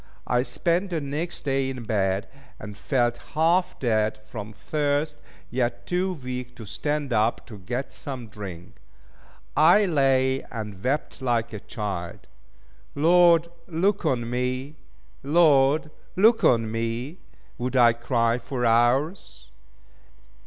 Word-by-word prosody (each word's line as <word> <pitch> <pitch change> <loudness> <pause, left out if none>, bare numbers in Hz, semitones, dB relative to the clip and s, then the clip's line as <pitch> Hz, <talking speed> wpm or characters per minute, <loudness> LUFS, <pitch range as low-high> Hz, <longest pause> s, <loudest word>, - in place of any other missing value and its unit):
I 125 +1 +2
spent 170 +9 0
the 170 -3 -1
next 150 +4 -4
day 135 -1 0
in 130 -2 -6
bed, 100 -2 0 0.3
and 105 0 -9
felt 120 +1 0 0.2
half 170 +4 +2
dead 110 -3 +1
from 110 -2 -7
thirst, 145 +6 -1 0.3
yet 120 -1 -1
too 185 +1 0
weak 125 0 -5
to 115 - -9
stand 145 +4 -2
up 110 +1 +1
to 105 -3 -11
get 125 +8 -4
some 130 -4 -6
drink. 95 -4 -9 0.8
I 175 +8 +6
lay 135 -5 +2
and 105 -5 -7
wept 140 +2 -2
like 115 -3 0
a 105 - -5
child. 100 -6 -5 0.7
"Lord 170 +2 +5 0.2
look 185 +4 0
on 125 -7 0
me! 130 +4 -3 0.4
Lord 150 0 +4 0.2
look 220 +5 +4
on 115 -2 +3
me!" 115 +8 -3 0.4
would 125 +1 -3
I 120 -2 +6
cry 115 0 0
for 120 +1 -3
hours. 120 - +1
130 Hz, 125 wpm, -25 LUFS, 115-150 Hz, 0.8 s, I